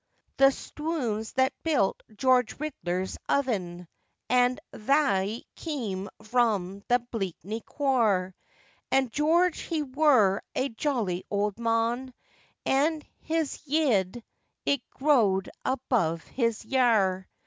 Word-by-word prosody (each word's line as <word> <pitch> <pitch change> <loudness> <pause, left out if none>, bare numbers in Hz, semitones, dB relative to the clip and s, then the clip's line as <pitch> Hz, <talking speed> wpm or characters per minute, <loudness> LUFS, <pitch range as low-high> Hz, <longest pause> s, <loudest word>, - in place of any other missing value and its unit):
] - - -46
THE 270 - +6
stwons 265 -7 -3
that 260 +1 +2
built 290 -12 +1
George 255 0 +2
Ridler's 190 -12 -3
oven, 180 -11 -1 0.4
And 250 +1 +3
thauy 220 -4 +1
keam 220 - -4 0.2
vrom 215 -5 0
the 245 - +4 0.2
Bleakney 200 +1 -4
quaar, 220 -10 +1 0.6
And 265 -3 +2
George 330 +6 +2
he 320 -3 -2
wur 260 -8 +3
a 270 - 0
jolly 225 -8 -1
old 205 +1 -1
mon, 235 +2 0 0.5
And 300 +3 +2 0.2
his 320 -2 -2
yead 240 - +1 0.4
it 280 -3 +2
grow'd 225 -10 +2
above 235 -11 0
his 230 -4 -2
yare. 215 -7 +2
240 Hz, 105 wpm, -27 LUFS, 200-275 Hz, 0.6 s, THE